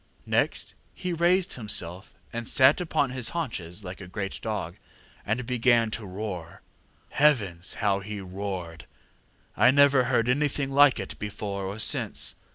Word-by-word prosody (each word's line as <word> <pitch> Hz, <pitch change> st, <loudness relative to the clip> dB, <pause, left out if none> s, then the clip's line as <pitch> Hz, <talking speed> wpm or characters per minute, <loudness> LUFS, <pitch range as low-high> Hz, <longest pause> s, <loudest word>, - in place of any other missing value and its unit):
Next -, -, 0 dB, 0.2 s
he 180 Hz, -1 st, -3 dB
raised 175 Hz, +2 st, +2 dB
himself 95 Hz, -5 st, -2 dB, 0.2 s
and 115 Hz, 0 st, -4 dB
sat 135 Hz, +4 st, +5 dB
upon 145 Hz, -5 st, 0 dB
his 125 Hz, -2 st, -1 dB
haunches 105 Hz, -, -4 dB
like 90 Hz, +1 st, -8 dB
a 90 Hz, -, -9 dB
great 95 Hz, +2 st, -5 dB
dog, 100 Hz, -6 st, -4 dB, 0.5 s
and 115 Hz, +4 st, -1 dB
began 120 Hz, -2 st, +2 dB
to 110 Hz, -2 st, -4 dB
roar. 90 Hz, -4 st, -6 dB, 0.5 s
Heavens! 100 Hz, -, +2 dB
how 100 Hz, -2 st, +1 dB
he 105 Hz, +1 st, -6 dB
roared! 90 Hz, -4 st, -6 dB, 0.7 s
I -, -, +5 dB
never 140 Hz, -1 st, +5 dB
heard 120 Hz, -2 st, +1 dB
anything 140 Hz, +1 st, 0 dB
like 140 Hz, -2 st, +5 dB
it 100 Hz, -, -7 dB
before 100 Hz, -1 st, -4 dB
or 100 Hz, +2 st, -5 dB
since. 110 Hz, -, +1 dB
110 Hz, 145 wpm, -26 LUFS, 95-130 Hz, 0.7 s, sat